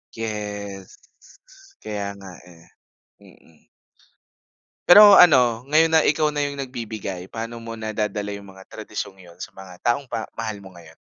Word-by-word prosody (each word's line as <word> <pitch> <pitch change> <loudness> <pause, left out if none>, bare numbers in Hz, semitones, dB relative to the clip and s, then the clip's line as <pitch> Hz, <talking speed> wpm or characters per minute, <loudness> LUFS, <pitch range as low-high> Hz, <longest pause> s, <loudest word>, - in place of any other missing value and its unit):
Yes. 105 -3 -6 0.8
Kaya 100 -2 -5
nga 95 -1 -11
eh. 85 -2 -18 0.5
Mm. 80 -2 -22 1.2
Pero 205 +3 +10
ano, 125 -11 +6
ngayon 160 +2 +4
na 160 - +6
ikaw 150 0 +1
na 145 - -1
yung 145 0 -3
nagbibigay, 110 -8 -6
paano 115 +1 -7
mo 115 0 -8
nadadala 105 -1 -3
yung 100 -1 -10
mga 95 0 -15
tradisyong 95 - -7
yun 85 -2 -17
sa - - -9
mga 95 -2 -12
taong 130 +2 0
ba 115 -2 -4
mahal 110 -2 -5
mo 95 -2 -14
ngayon? 80 -2 -16
110 Hz, 145 wpm, -22 LUFS, 95-125 Hz, 1.2 s, Pero